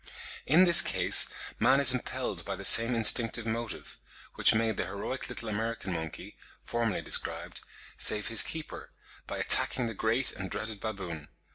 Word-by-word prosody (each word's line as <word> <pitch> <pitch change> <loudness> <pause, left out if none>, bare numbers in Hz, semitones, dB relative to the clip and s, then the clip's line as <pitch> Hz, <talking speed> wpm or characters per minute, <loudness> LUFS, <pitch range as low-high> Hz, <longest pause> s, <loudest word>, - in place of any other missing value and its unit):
In 170 +6 +3
this 170 -2 +10
case - - +3 0.3
man 130 +4 +1
is 140 -2 +7
impelled 125 - -6
by - - -7
the - - -10
same 115 +2 +6
instinctive 115 0 +1
motive, 115 -2 -8 0.3
which - - +1
made 110 -1 -2
the - - -5
heroic 100 +7 -7
little 115 - -8
American 110 -2 -6
monkey, 80 -2 -9 0.3
formerly 115 -3 -5
described, - - -3 0.4
save 105 -1 +1
his 115 - +3
keeper, 160 -1 -7 0.4
by - - -8
attacking 125 -2 +1
the 115 - -6
great 115 +5 -2
and 95 -1 -8
dreaded 110 +1 -8
baboon. 90 -9 -9
115 Hz, 155 wpm, -26 LUFS, 105-120 Hz, 0.4 s, this